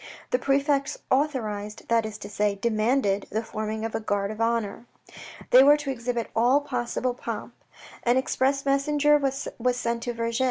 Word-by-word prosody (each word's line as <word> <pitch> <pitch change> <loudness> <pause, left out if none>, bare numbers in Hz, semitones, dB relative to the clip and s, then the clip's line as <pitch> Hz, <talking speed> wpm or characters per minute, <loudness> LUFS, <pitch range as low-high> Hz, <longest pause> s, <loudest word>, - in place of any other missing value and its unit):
The - - +2
prefect 275 0 +1
authorised, 220 -7 -1
that 230 -1 +2
is 215 -1 -7
to 205 - -8
say, 205 0 0
demanded 215 -1 +1
the 220 +2 -2
forming 215 0 -4
of 225 - -4
a - - -1
guard 205 -2 -1
of 215 +1 -6
honour. 230 0 -1 0.6
They 255 - +9
were 290 +2 +7
to 290 -2 -3
exhibit 240 -2 -3
all 245 +5 +4
possible 250 -2 -2
pomp. 245 - -6 0.5
An 240 +1 +2
express 270 +1 0
messenger 295 +2 +3
was 275 -1 -2 0.3
sent 235 -1 -2
to 240 0 -3
Vergy. 230 +1 -2
235 Hz, 165 wpm, -26 LUFS, 220-275 Hz, 0.6 s, They